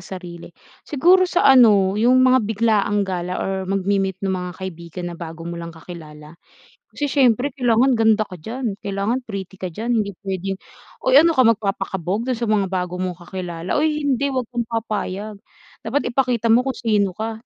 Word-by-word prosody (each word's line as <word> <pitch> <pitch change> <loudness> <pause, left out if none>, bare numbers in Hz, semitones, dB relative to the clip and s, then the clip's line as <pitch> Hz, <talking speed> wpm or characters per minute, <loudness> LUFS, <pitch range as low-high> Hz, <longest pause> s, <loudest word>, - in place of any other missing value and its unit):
sarili. 175 -1 -9 0.4
Siguro 360 +6 +4
sa 355 - +1
ano 215 -8 +6
yung 255 +3 +4
mga 255 0 +5
biglaang 210 -1 +1
gala 180 -1 -3
or 195 - -2 0.2
magmi-meet 195 -1 0
ng 190 - 0
mga 180 -1 -3
kaibigan 170 -1 -7
na 170 - -9
bago 165 -1 -8
mo 170 0 -5
lang 170 0 -8
kakilala. 160 -2 -12 0.5
Kasi 290 - -3
siyempre 265 -1 +2
kailangan 250 0 +3
ganda 220 -2 +3
ka 185 - -10
diyan, 230 +1 -3
kailangan 200 +6 -2
pretty 195 -5 -7
ka 185 - -3
diyan, 230 +8 -2
hindi 200 - -5
p'wedeng, 195 -1 -4 0.5
oy 260 - +4
ano 335 - +4
ka 255 - +6
magpapakabog 200 -1 -1
dun 255 - 0
sa 230 -1 -2
mga 200 -2 +2
bago 180 -1 -3
mong 185 -1 -2 0.2
kakilala? 180 0 -3
Oy, 300 0 +1
hindi 280 -1 +1
wag 260 -2 -1
kang 240 -2 -2
papayag. 215 -2 -4 0.5
Dapat 265 +5 -1
ipakita 240 -3 +1
mo 245 +4 +4
kung 265 - -1
sino 205 -5 +1
ka. 220 +2 -4
210 Hz, 175 wpm, -21 LUFS, 185-245 Hz, 0.5 s, ano